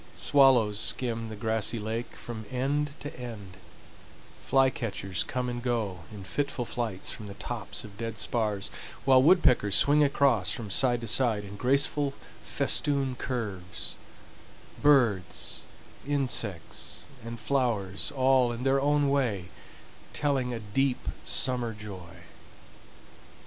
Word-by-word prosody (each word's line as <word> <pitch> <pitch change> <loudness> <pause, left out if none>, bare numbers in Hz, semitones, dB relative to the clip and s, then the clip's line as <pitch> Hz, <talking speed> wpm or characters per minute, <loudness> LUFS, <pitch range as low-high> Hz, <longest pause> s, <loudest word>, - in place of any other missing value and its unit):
Swallows 125 -7 +4
skim 115 -1 0
the 110 - -6
grassy 110 +1 0
lake 110 +2 -4
from 110 -2 -7
end 140 +3 -1
to 145 -1 -7
end, 105 -7 -8 0.9
fly 135 -1 +4
catchers 95 -8 -3
come 125 -1 -3
and 120 0 -3
go 115 -7 -1
in 105 -2 -9
fitful 135 +4 -2
flights 110 -6 -3
from 105 - -8
the 100 - -8
tops - - -5
of 105 -1 -12
dead 115 -2 -4
spars, 105 - -1 0.3
while 130 -1 +6
woodpeckers 130 - +5
swing 150 +1 +5
across 140 -8 +2
from 110 -4 -4
side 120 +2 +3
to 115 - -5
side 110 -2 +2
in 100 0 -9
graceful 140 +4 +1 0.3
festoon 140 -3 +1
curves,—birds, 115 +1 -2 0.5
insects, 125 - -2 0.2
and 115 0 -7
flowers 110 -8 0
all 130 -2 +4
in 120 +1 -5
their 135 +1 +3
own 145 0 +2
way 120 -10 0 0.6
telling 135 -4 0
a 120 - -3
deep 125 +5 -1 0.2
summer 125 -3 0
joy. 95 -5 -10
120 Hz, 125 wpm, -28 LUFS, 105-135 Hz, 0.9 s, while